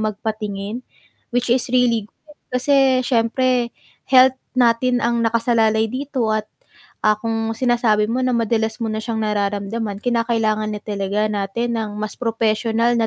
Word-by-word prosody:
magpatingin, 215 0 -3 0.5
which 245 0 +1
is 245 0 0
really 235 -4 +2
good, 300 +4 -22 0.2
kasi 265 -1 +3
siyempre 245 +1 +1 0.4
health 260 0 +6 0.2
natin 245 0 +3
ang 235 0 +1
nakasalalay 225 -1 +2
dito 265 -3 -2
at, 215 0 -2 0.6
ah, 215 0 +4
kung 225 0 -2
sinasabi 235 -4 +2
mo 250 - 0
na 255 - +1
madalas 220 -1 0
mo 225 - -1
na - - -2
siyang 225 -1 -3
nararamdaman, 205 0 -2
kinakailangan 225 -3 0
na 210 - -5
talaga 205 0 -1
natin 215 +4 -2
ng 215 -2 -3
mas 215 -1 -4
propesyonal 230 0 +1
na 225 - +2
230 Hz, 140 wpm, -20 LUFS, 215-245 Hz, 0.6 s, health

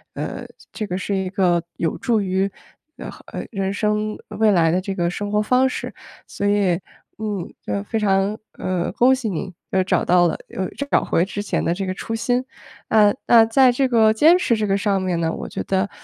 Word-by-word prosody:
呃， - - -5 0.3
这 215 - -3
个 180 -1 -3
是 195 +1 -2
一 190 -1 -2
个 175 -3 +1
有 165 - -1
助 230 -3 +1
于， 190 0 0 0.5
呃 - - -7 0.2
呃， - - -5
人 195 -2 -2
生 210 0 -1
未 220 -1 +2
来 165 -3 +3
的 185 +2 +1
这 195 +1 -4
个 175 -2 0
生 205 +3 -4
活 210 0 +2
方 255 +4 +3
式， - - -5 0.3
所 205 - -4
以， 205 -2 +2 0.5
嗯， 210 -5 -4
就 100 -1 -2
非 225 - -3
常 200 0 +1 0.2
呃， 185 -2 -2
恭 260 +2 +4
喜 245 -5 -3
你 185 +1 -4 0.2
又 190 - +2
找 - - +1
到 175 0 +4
了 - - -2
又 185 -1 -3 0.2
找 - - +4
回 170 - +2
之 205 +1 -4
前 205 - -2
的 170 - +1
这 195 +1 -3
个 185 - -2
初 225 - -6
心。 245 +3 0 0.5
呃， 210 +1 +5
那 230 -2 +7
在 250 +3 +5
这 265 +2 +1
个 225 -3 +4
坚 315 +11 +5
持 235 -10 +1
这 210 -1 -1
个 195 0 +2
上 195 -1 0
面 180 -2 -1
呢， 165 0 0
我 - - -5
觉 - - -5
得 190 +1 0
200 Hz, 230 characters per minute, -21 LUFS, 185-220 Hz, 0.5 s, 那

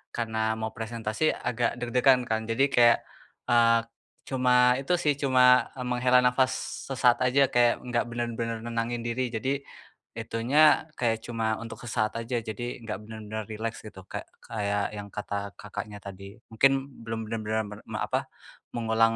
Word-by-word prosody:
karena 110 -1 -1
mau 110 0 -3
presentasi 115 +4 -1
agak 120 0 -1
deg-degan 125 +1 +3
kan. 110 -1 -1
Jadi 120 +4 +3
kaya, 120 -1 +7 0.6
eee, 115 -1 +5 0.5
cuma 125 -1 +4
itu 140 +6 -1
sih, 150 -3 +2
cuma, 125 -2 +5
eee, 125 -1 -5
menghela 125 0 +3
nafas 125 +1 +3 0.3
sesaat 125 -3 +3
aja, 130 +2 +3
kayak 120 -1 +3
nggak 120 -1 0
bener-bener 115 -1 -3
nenangin 115 0 -2
diri, 120 +2 -1
jadi 130 +5 -2 0.6
itunya 135 +8 +3
kayak 115 -2 +1
cuma 115 -2 -1
untuk 115 - -8
sesaat 110 -2 -1
aja, 115 +1 -2
jadi 120 +3 -5
nggak 105 -3 -4
bener-bener 110 0 -6
rileks 110 +1 -4
gitu 95 -3 -10
kayak - - -6 0.2
kayak 100 -3 -1
yang 100 0 -6
kata 100 -1 -4
Kakaknya 105 +1 -7
tadi. 100 0 -9 0.2
Mungkin 135 +5 +5 0.3
belum 115 0 -4
bener-bener 110 -1 -1
mer 105 0 -9
me - - -4
apa, - - -1 0.5
mengulang 115 -1 +2
115 Hz, 150 wpm, -27 LUFS, 110-125 Hz, 0.6 s, kaya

